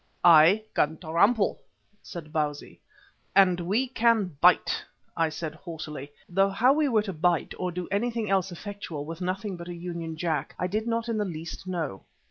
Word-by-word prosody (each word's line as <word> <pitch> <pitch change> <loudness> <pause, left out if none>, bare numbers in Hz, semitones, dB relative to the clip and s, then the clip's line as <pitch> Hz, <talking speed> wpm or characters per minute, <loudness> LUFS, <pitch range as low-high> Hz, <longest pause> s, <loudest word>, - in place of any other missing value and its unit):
"I 170 +5 +7
can 155 +2 +1
trample," 195 +7 +2 0.4
said 155 -4 -9
Bausi. 150 -2 -3 0.6
"And 185 -3 +5
we 205 +10 0
can 230 - +2
bite," - - +4 0.3
I 165 -1 +2
said 155 0 -5
haughtily, 155 -4 -8 0.2
though 195 +2 +2
how 240 +7 +4
we 300 -1 +2
were 220 -4 +3
to 195 -3 -4
bite 170 0 +1
or 180 -1 -1
do 180 0 -5
anything 225 +2 -1
else 190 -1 +1
effectual 175 -5 -6
with 165 +3 -7
nothing 190 +1 -3
but 170 0 -9
a 175 - -5
Union 170 -2 -5
Jack, 160 -4 -2
I 180 - -1
did 215 +5 -2
not 230 0 -1
in 230 -2 -1
the - - +2
least 165 +1 -7
know. 165 - -3
180 Hz, 175 wpm, -27 LUFS, 160-205 Hz, 0.6 s, I